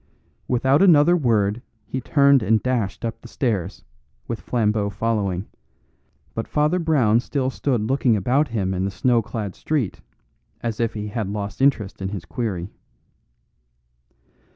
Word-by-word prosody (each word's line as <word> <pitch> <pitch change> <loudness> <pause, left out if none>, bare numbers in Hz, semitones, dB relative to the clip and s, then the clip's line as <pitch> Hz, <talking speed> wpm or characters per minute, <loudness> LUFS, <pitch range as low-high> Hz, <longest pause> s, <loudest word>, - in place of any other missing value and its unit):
Without 130 +4 +3
another 175 -2 +6
word 115 - +1 0.2
he 130 - -4
turned 140 0 +4
and 110 0 +2
dashed 120 -5 -1
up 115 0 -4
the - - -11
stairs, 115 -8 -2 0.4
with 115 - -4
Flambeau 105 -3 0
following; 100 -3 -1 0.9
but 115 - -4
Father 150 +4 +1
Brown 130 -10 +3
still 130 +1 -2
stood 130 -4 -1
looking 125 +1 +2
about 130 +9 +2
him 100 -6 -1
in 95 0 -1
the 95 - 0
snow 115 +5 +2
clad 110 -3 -5
street 140 -11 -2 0.6
as 115 -2 -3
if 115 -2 0
he 105 0 -4
had 105 -2 -3
lost 100 +1 -5
interest 110 -9 +1
in 95 - -2
his 95 -5 -6
query. 90 0 -4
115 Hz, 145 wpm, -22 LUFS, 100-130 Hz, 0.9 s, another